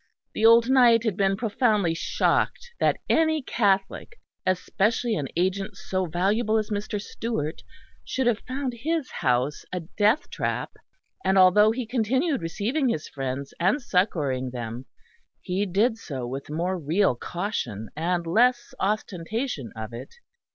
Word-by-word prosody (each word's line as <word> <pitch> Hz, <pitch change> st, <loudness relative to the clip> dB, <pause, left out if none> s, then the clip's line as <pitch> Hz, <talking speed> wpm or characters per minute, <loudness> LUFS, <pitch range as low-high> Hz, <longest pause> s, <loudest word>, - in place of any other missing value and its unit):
The 220 Hz, -, +4 dB
old 230 Hz, +1 st, +6 dB
knight 245 Hz, -3 st, +5 dB
had 220 Hz, -5 st, 0 dB
been 195 Hz, 0 st, +1 dB
profoundly 210 Hz, -5 st, +1 dB
shocked 475 Hz, -, 0 dB
that -, -, +2 dB
any 315 Hz, -2 st, +2 dB
Catholic, 200 Hz, -, 0 dB, 0.3 s
especially 215 Hz, +5 st, +1 dB
an 145 Hz, -10 st, -2 dB
agent 190 Hz, +3 st, -1 dB
so 185 Hz, -1 st, -2 dB
valuable 205 Hz, +7 st, +1 dB
as 215 Hz, 0 st, -2 dB
Mr. 205 Hz, 0 st, -2 dB
Stewart, 200 Hz, -7 st, -4 dB, 0.4 s
should 260 Hz, -, -2 dB
have 235 Hz, -2 st, +2 dB
found 260 Hz, 0 st, -3 dB
his 320 Hz, -1 st, -1 dB
house 130 Hz, +2 st, 0 dB
a 180 Hz, -1 st, -3 dB
death 210 Hz, -, +1 dB
trap; -, -, -2 dB, 0.5 s
and 190 Hz, -, +2 dB
although 190 Hz, +3 st, +6 dB
he 240 Hz, +2 st, -2 dB
continued 260 Hz, -, 0 dB
receiving 235 Hz, -, -1 dB
his 155 Hz, -9 st, -2 dB
friends 135 Hz, 0 st, -5 dB
and 190 Hz, +11 st, +2 dB
succouring 150 Hz, -, 0 dB
them, 120 Hz, 0 st, -6 dB, 0.5 s
he 190 Hz, +3 st, -2 dB
did 220 Hz, +5 st, +1 dB
so 135 Hz, -, -5 dB
with 135 Hz, +4 st, -6 dB
more 175 Hz, +4 st, -1 dB
real 165 Hz, +3 st, +2 dB
caution 120 Hz, -, -4 dB
and 170 Hz, +2 st, -1 dB
less 240 Hz, +7 st, +2 dB
ostentation 200 Hz, -, -2 dB
of 110 Hz, +1 st, -6 dB
it. 120 Hz, -, -9 dB
200 Hz, 140 wpm, -25 LUFS, 165-230 Hz, 0.5 s, old